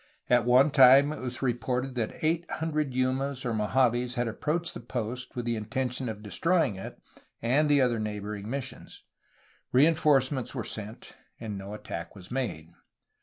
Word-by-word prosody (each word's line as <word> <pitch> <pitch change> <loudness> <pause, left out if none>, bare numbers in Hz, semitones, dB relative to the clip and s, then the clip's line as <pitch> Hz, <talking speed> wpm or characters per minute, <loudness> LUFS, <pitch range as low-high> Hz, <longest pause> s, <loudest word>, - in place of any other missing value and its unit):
At 120 -2 +4
one 130 +4 +5
time 135 +2 +7
it - - -7
was 130 +1 -5
reported 125 +1 -1
that 120 +2 -4
eight 165 +2 +1
hundred 155 -3 -1
Yumas 130 +1 -1
or 120 - 0
Mojaves 120 +3 +1
had 120 -1 0
approached 160 +9 -2
that 120 - -10
post 120 +2 -4
with 120 -1 -3
the 120 -1 0
intention 125 +3 -3
of 105 -1 -7
destroying 165 - +1
it 95 - -8 0.4
and 140 +6 +2
the 145 -1 +5
other 120 -3 +2
neighboring 105 -1 -4
missions. 135 0 -6 0.7
Rein 145 +6 +5
forcements 135 -4 +1
were 120 - -2
sent, 110 0 -8 0.2
and 110 -3 -5
no 100 +2 -7
attack 85 -4 -7
was 95 0 -12
made. 95 -11 -3
125 Hz, 165 wpm, -28 LUFS, 110-135 Hz, 0.7 s, time